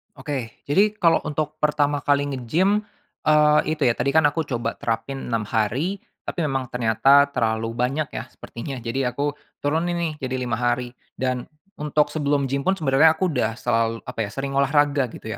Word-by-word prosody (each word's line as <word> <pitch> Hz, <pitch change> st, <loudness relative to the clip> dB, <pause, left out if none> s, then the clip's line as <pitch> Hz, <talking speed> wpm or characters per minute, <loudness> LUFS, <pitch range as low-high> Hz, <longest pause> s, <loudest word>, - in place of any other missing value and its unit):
Oke, 135 Hz, -4 st, -6 dB
jadi 205 Hz, +8 st, +2 dB
kalau 165 Hz, -5 st, +4 dB
untuk 150 Hz, +1 st, -3 dB
pertama 145 Hz, -1 st, +1 dB
kali 145 Hz, 0 st, +2 dB
nge-gym, 170 Hz, -, +1 dB, 0.5 s
eee, 150 Hz, 0 st, +5 dB, 0.2 s
itu 150 Hz, -, -2 dB
ya, 120 Hz, -, +4 dB
tadi 140 Hz, -, 0 dB
kan 160 Hz, -, +6 dB
aku 160 Hz, 0 st, -3 dB
coba 120 Hz, -3 st, -3 dB
terapin 120 Hz, +4 st, -3 dB
6 115 Hz, -3 st, -1 dB
hari 125 Hz, -, -1 dB, 0.3 s
tapi 170 Hz, -, -2 dB
memang 135 Hz, -3 st, -1 dB
ternyata 125 Hz, +5 st, +4 dB
terlalu 115 Hz, -2 st, 0 dB
banyak 130 Hz, +6 st, -1 dB
ya, -, -, -5 dB
sepertinya. 135 Hz, +4 st, -8 dB
Jadi 125 Hz, +2 st, -1 dB
aku 145 Hz, +4 st, -1 dB, 0.3 s
turunin 165 Hz, +4 st, 0 dB
nih 170 Hz, -2 st, -1 dB
jadi 130 Hz, -1 st, -3 dB
5 120 Hz, -1 st, -2 dB
hari 120 Hz, 0 st, 0 dB, 0.2 s
dan 130 Hz, -1 st, -2 dB, 0.3 s
untuk 150 Hz, 0 st, +1 dB
sebelum 145 Hz, -2 st, 0 dB
gym 140 Hz, +4 st, -1 dB
pun 190 Hz, -, +4 dB
sebenernya 155 Hz, 0 st, +4 dB
aku 180 Hz, 0 st, 0 dB
udah 115 Hz, -5 st, 0 dB
selal 115 Hz, -1 st, 0 dB
apa 110 Hz, -3 st, -3 dB
ya, -, -, -9 dB
sering 135 Hz, +2 st, -4 dB
olahraga 140 Hz, -1 st, +3 dB
gitu 110 Hz, -1 st, -8 dB
140 Hz, 175 wpm, -23 LUFS, 120-150 Hz, 0.5 s, kan